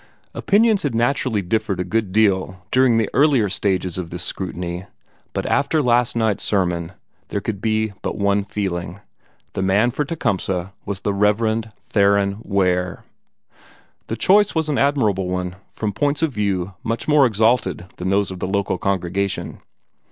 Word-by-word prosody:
Opinions 215 Hz, 0 st, +3 dB
had 140 Hz, -6 st, -1 dB
naturally 120 Hz, -3 st, +1 dB
differed 100 Hz, +1 st, -1 dB
a -, -, +1 dB
good 105 Hz, +1 st, -1 dB
deal 95 Hz, -3 st, +1 dB
during 130 Hz, -3 st, +4 dB
the 110 Hz, -2 st, +2 dB
earlier 135 Hz, -8 st, +4 dB
stages 95 Hz, -2 st, -1 dB
of 85 Hz, -2 st, -5 dB
this 85 Hz, 0 st, -5 dB
scrutiny, 90 Hz, -1 st, -4 dB, 0.5 s
but -, -, -3 dB
after 140 Hz, +3 st, +1 dB
last 120 Hz, -3 st, +2 dB
night's 110 Hz, -3 st, +1 dB
sermon 90 Hz, -3 st, 0 dB, 0.3 s
there 100 Hz, -, -2 dB
could 100 Hz, -1 st, -4 dB
be 110 Hz, -1 st, 0 dB
but -, -, -3 dB
one 100 Hz, 0 st, +2 dB
feeling. 95 Hz, -3 st, -4 dB, 0.5 s
The -, -, -2 dB
man 100 Hz, +6 st, +3 dB
for 150 Hz, -, -1 dB
Tecumseh 95 Hz, -, -2 dB
was 100 Hz, -1 st, -4 dB
the 100 Hz, -, -1 dB
Reverend 110 Hz, +2 st, +1 dB
Theron 100 Hz, 0 st, +2 dB
Ware. 90 Hz, -3 st, 0 dB, 1.0 s
The -, -, -3 dB
choice 205 Hz, +1 st, +4 dB
was 160 Hz, -1 st, 0 dB
an 145 Hz, -, +1 dB
admirable 110 Hz, -10 st, +2 dB
one, 90 Hz, 0 st, -3 dB, 0.2 s
from 105 Hz, -2 st, -3 dB
points 145 Hz, +8 st, 0 dB
of 160 Hz, -, +2 dB
view 100 Hz, -3 st, -1 dB
much 115 Hz, +1 st, -2 dB
more 150 Hz, -3 st, +5 dB
exalted 110 Hz, -4 st, +1 dB
than 90 Hz, +1 st, -2 dB
those 100 Hz, -1 st, +1 dB
of 95 Hz, -, -7 dB
the -, -, -2 dB
local 100 Hz, -1 st, -1 dB
congregation. 100 Hz, 0 st, -2 dB
100 Hz, 160 wpm, -21 LUFS, 95-115 Hz, 1.0 s, more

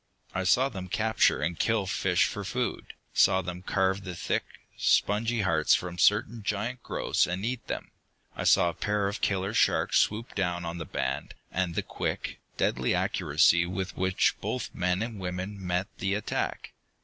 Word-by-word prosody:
I 95 Hz, 0 st, -1 dB
saw 125 Hz, +9 st, +4 dB
them 95 Hz, -7 st, -6 dB
capture 110 Hz, -6 st, +2 dB
and 85 Hz, +1 st, -2 dB
kill 110 Hz, -3 st, +1 dB
fish 95 Hz, -2 st, +2 dB
for -, -, -4 dB
food, -, -, -3 dB, 0.2 s
saw 95 Hz, -1 st, +4 dB
them 90 Hz, 0 st, -5 dB
carve 95 Hz, +1 st, 0 dB
the 90 Hz, -2 st, -6 dB
thick, 85 Hz, -, -1 dB, 0.3 s
spongy 115 Hz, +3 st, +2 dB
hearts 80 Hz, -5 st, +3 dB
from 90 Hz, -1 st, -4 dB
certain 110 Hz, +4 st, +3 dB
giant 110 Hz, +5 st, -2 dB
growths -, -, 0 dB
and 90 Hz, +3 st, -3 dB
eat 125 Hz, 0 st, -3 dB
them. -, -, -5 dB, 0.4 s
I -, -, -4 dB
saw 85 Hz, -, +5 dB
a -, -, -4 dB
pair 105 Hz, +1 st, 0 dB
of 100 Hz, -, -4 dB
killer 95 Hz, +1 st, 0 dB
sharks -, -, +3 dB
swoop 110 Hz, +3 st, 0 dB
down 90 Hz, -3 st, -1 dB
on 85 Hz, +1 st, -4 dB
the 80 Hz, -, -4 dB
band, 65 Hz, -2 st, -3 dB, 0.2 s
and 90 Hz, -2 st, -1 dB
the -, -, 0 dB
quick, -, -, -4 dB, 0.2 s
deadly 65 Hz, +1 st, +1 dB
accuracy 85 Hz, +3 st, +3 dB
with 95 Hz, +1 st, -4 dB
which 95 Hz, 0 st, +2 dB
both -, -, -3 dB
men 90 Hz, +3 st, 0 dB
and 115 Hz, -3 st, -6 dB
woman 95 Hz, +2 st, -5 dB
met 90 Hz, +1 st, 0 dB
the 95 Hz, +1 st, 0 dB
attack. 105 Hz, -, -3 dB
95 Hz, 175 wpm, -28 LUFS, 90-105 Hz, 0.4 s, saw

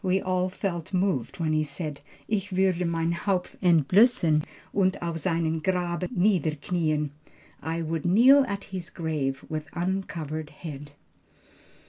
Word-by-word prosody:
We 190 Hz, 0 st, +2 dB
all 185 Hz, -1 st, 0 dB
felt 185 Hz, -2 st, -3 dB
moved 180 Hz, -, 0 dB
when 160 Hz, -2 st, +1 dB
he 155 Hz, -, +3 dB
said, 150 Hz, 0 st, -5 dB, 0.3 s
'Ich 205 Hz, -2 st, -1 dB
würde 185 Hz, -2 st, +1 dB
mein 165 Hz, 0 st, 0 dB
Haupt 180 Hz, +1 st, -1 dB
entblössen 175 Hz, -, +4 dB, 0.3 s
und 190 Hz, -1 st, +2 dB
auf 170 Hz, -1 st, -2 dB
seinem 165 Hz, -1 st, 0 dB
Grabe 180 Hz, 0 st, -1 dB
niederknieen.' 160 Hz, -4 st, 0 dB, 0.5 s
(I 165 Hz, +1 st, -2 dB
would 160 Hz, -1 st, -2 dB
kneel 250 Hz, +10 st, +6 dB
at 200 Hz, -2 st, -3 dB
his 185 Hz, -1 st, -5 dB
grave 150 Hz, -6 st, -2 dB
with 155 Hz, -1 st, -5 dB
uncovered 170 Hz, -4 st, -3 dB
head.)" 150 Hz, -3 st, -8 dB
170 Hz, 130 wpm, -27 LUFS, 155-185 Hz, 0.5 s, kneel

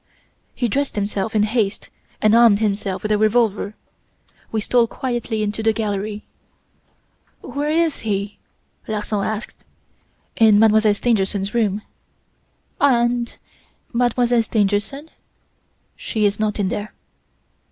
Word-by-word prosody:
"He 245 Hz, -, 0 dB
dressed 275 Hz, +5 st, -1 dB
himself 205 Hz, +1 st, -2 dB
in 210 Hz, -, +4 dB
haste 215 Hz, -2 st, -1 dB, 0.3 s
and 215 Hz, 0 st, +5 dB
armed 230 Hz, -3 st, +6 dB
himself 200 Hz, -2 st, -2 dB
with 215 Hz, -, -2 dB
a 210 Hz, -, +2 dB
revolver. 215 Hz, -2 st, +1 dB, 0.8 s
We 220 Hz, -, 0 dB
stole 235 Hz, +2 st, +2 dB
quietly 240 Hz, -3 st, -3 dB
into 210 Hz, +1 st, -2 dB
the 220 Hz, 0 st, +2 dB
gallery. 210 Hz, -1 st, -3 dB, 1.2 s
"'Where 290 Hz, +1 st, -3 dB
is 325 Hz, -1 st, +1 dB
he?' 200 Hz, -1 st, -3 dB, 0.5 s
Larsan 210 Hz, -1 st, -2 dB
asked. 220 Hz, +1 st, -5 dB, 0.7 s
"'In 220 Hz, -2 st, +6 dB
Mademoiselle 215 Hz, -1 st, +4 dB
Stangerson's 200 Hz, -3 st, 0 dB
room. 210 Hz, -3 st, 0 dB, 1.0 s
"'And 240 Hz, -3 st, +2 dB, 0.6 s
Mademoiselle 240 Hz, 0 st, +2 dB
Stangerson?' 215 Hz, +8 st, -1 dB, 0.8 s
"'She 215 Hz, -2 st, -2 dB
is 205 Hz, +1 st, 0 dB
not 215 Hz, -1 st, -1 dB
in 195 Hz, -2 st, +1 dB
there. 210 Hz, +2 st, -5 dB
215 Hz, 115 wpm, -20 LUFS, 205-235 Hz, 1.2 s, armed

